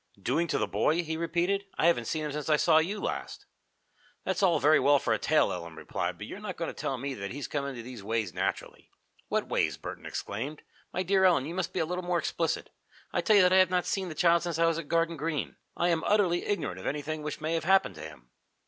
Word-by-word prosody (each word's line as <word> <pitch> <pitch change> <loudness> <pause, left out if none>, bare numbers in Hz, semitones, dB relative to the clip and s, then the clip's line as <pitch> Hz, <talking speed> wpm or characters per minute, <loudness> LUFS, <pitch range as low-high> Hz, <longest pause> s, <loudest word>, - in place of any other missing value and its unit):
"Doing 170 +1 0
to - - 0
the - - +1
boy?" 170 +3 +1
he 160 0 -3
repeated. 175 +4 0
"I - - +2
haven't 170 -9 +3
seen 155 +3 -2
him 150 - -3
since 150 +1 -4
I 155 - +6
saw 160 +1 +5
you 195 +6 -1
last." - - -4 0.8
"That's - - -1
all 175 -5 +4
very 150 +2 +5
well 145 +2 +5
for 115 -4 0
a 110 - 0
tale," - - +2
Ellen 85 -1 -7
replied, 90 +2 -3
"but 100 - -7
you're 190 - -8
not 205 -4 -6
going 165 - -2
to - - -6
tell 135 - -3
me 135 +2 -4
that 100 -5 -5
he's 145 +2 -5
come 140 -2 -2
into 125 -4 -6
these 120 -4 -9
ways 110 +1 -1
naturally." - - -3 0.4
"What - - -1
ways?" - - 0
Burton - - -8
exclaimed. 130 +9 -5 0.3
"My 185 - -1
dear 190 +1 +2
Ellen, 175 -8 +4
you 160 - -5
must 180 -1 -2
be - - -2
a - - +1
little 180 +2 -3
more 175 0 0
explicit. 165 0 -2 0.4
I - - +1
tell 215 - +4
you 200 - +7
that 180 0 +4
I - - +6
have 185 -1 +6
not 180 -1 +1
seen 190 -2 -1
the 155 - -7
child 170 +1 +4
since 170 -1 -3
I 165 - +3
was 165 0 +1
at - - -7
Garden 165 0 +1
Green. 155 0 -3 0.2
I 175 - +2
am 165 -2 +1
utterly 190 -5 +2
ignorant 165 - -2
of - - -6
anything 150 +2 -3
which 150 -1 -5
may 160 +1 -2
have 165 -2 -1
happened 190 +1 +4
to 80 - -11
him." 75 -6 -11
160 Hz, 255 wpm, -29 LUFS, 140-175 Hz, 0.8 s, you